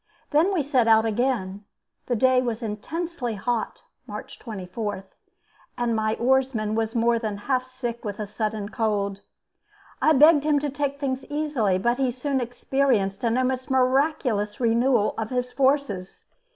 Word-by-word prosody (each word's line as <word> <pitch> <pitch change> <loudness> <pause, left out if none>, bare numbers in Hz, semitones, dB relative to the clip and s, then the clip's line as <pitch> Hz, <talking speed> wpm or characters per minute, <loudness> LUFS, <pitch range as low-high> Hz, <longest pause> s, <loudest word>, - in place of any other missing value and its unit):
Then 320 +7 +4
we 355 -6 +1
set 260 -4 +2
out 220 0 +5
again. 215 -4 -1 0.4
The 245 - +1
day 255 +2 +4
was 235 -2 -3
intensely 245 +4 -4
hot 240 - -3 0.2
(March - - -8
24), 205 -1 -5 0.7
and 240 -1 0
my 220 0 0
oarsman 250 -4 +1
was 225 +1 -1
more 235 0 +3
than 215 -3 -3
half 255 -1 0
sick 240 -2 -5
with 205 -2 -5
a 210 - -2
sudden 210 0 -3
cold. 200 -3 -1 0.8
I 315 - +5
begged 300 +1 +6
him 300 -1 +3
to 285 0 -1
take 280 0 -2
things 265 -2 -2
easily, 290 -10 0
but 240 +6 0
he 265 -2 +2
soon 265 +2 -2
experienced 240 -5 0
an 230 0 +2
almost 255 0 -1
miraculous 255 -5 +1
renewal 235 -1 +2
of 220 -1 -3
his 250 -1 -2
forces. 265 -9 0
245 Hz, 150 wpm, -25 LUFS, 215-270 Hz, 0.8 s, begged